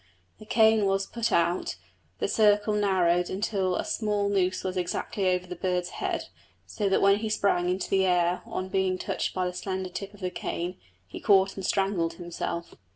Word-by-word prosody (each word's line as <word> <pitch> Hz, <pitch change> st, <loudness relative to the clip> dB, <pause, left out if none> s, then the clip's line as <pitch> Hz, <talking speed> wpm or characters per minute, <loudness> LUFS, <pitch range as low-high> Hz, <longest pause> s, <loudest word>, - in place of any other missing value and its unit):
The 215 Hz, -, -13 dB
cane 220 Hz, -2 st, +4 dB
was 195 Hz, 0 st, +1 dB
put 230 Hz, +1 st, -2 dB
out, 170 Hz, -, +1 dB, 0.4 s
the -, -, -1 dB
circle 210 Hz, 0 st, +3 dB
narrowed 180 Hz, -4 st, +2 dB
until 190 Hz, -2 st, -1 dB
the -, -, -1 dB
small 210 Hz, -2 st, 0 dB
noose 185 Hz, -2 st, +1 dB
was 185 Hz, 0 st, -3 dB
exactly 185 Hz, +2 st, -1 dB
over 180 Hz, 0 st, 0 dB
the 180 Hz, 0 st, -7 dB
bird's 180 Hz, 0 st, -1 dB
head, -, -, -2 dB, 0.4 s
so 205 Hz, -3 st, -2 dB
that 195 Hz, -, +2 dB
when 200 Hz, 0 st, +6 dB
he 220 Hz, 0 st, -3 dB
sprang 185 Hz, -4 st, +1 dB
into 185 Hz, +1 st, -1 dB
the 190 Hz, -1 st, +2 dB
air 175 Hz, 0 st, +2 dB
on 185 Hz, 0 st, -4 dB
being 190 Hz, -1 st, +1 dB
touched -, -, -3 dB
by 185 Hz, -1 st, 0 dB
the 180 Hz, -, -2 dB
slender 185 Hz, 0 st, -3 dB
tip 195 Hz, +2 st, -6 dB
of 205 Hz, -, -17 dB
the 180 Hz, -1 st, -2 dB
cane 180 Hz, 0 st, -4 dB, 0.3 s
he 90 Hz, -, -9 dB
caught 195 Hz, -1 st, +4 dB
and 195 Hz, -, -6 dB
strangled 190 Hz, -4 st, +1 dB
himself. 170 Hz, 0 st, -5 dB
190 Hz, 190 wpm, -27 LUFS, 180-200 Hz, 0.4 s, when